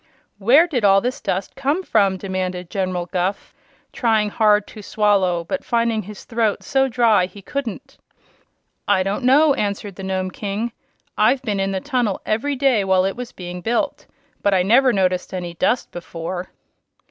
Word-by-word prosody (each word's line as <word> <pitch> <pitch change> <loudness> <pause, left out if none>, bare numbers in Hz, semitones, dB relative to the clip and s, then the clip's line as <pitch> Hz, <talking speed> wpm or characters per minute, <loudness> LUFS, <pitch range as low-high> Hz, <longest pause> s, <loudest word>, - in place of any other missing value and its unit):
"Where 255 - +6
did 270 -10 -2
all 195 -1 +6
this 250 +5 -3
dust 190 +1 -3
come 285 +7 -1
from?" 200 - +2
demanded 185 -2 -4
General 185 -3 -2
Guph, 185 +2 -3 0.4
trying 220 -3 +1
hard 210 -1 +3
to 215 - -10
swallow 195 -5 +1
but 275 +11 -4
finding 230 -2 0
his 210 0 -10
throat 225 -3 -1
so 270 0 +2
dry 225 -7 +3
he 195 +2 -14
couldn't. 275 +2 -6 0.9
"I 195 -2 +3
don't 195 +6 -2
know," 280 +4 +5
answered 200 -3 -3
the 195 - -7
Nome 185 -1 -2
King. 210 +5 -3 0.5
"I've 250 +5 +3
been 210 -5 -1
in 195 0 0
the 190 - -1
tunnel 245 -8 -1
every 260 +7 -1
day 260 -6 +2
while 190 -1 +3
it 195 - -1
was 245 0 -7
being 180 0 -8
built, 230 +5 -2 0.3
but 200 -1 +2
I 180 - +3
never 250 +7 +5
noticed 185 -3 0
any 175 -2 -5
dust 240 +8 0
before." 175 +1 -6
205 Hz, 170 wpm, -21 LUFS, 185-240 Hz, 0.9 s, Where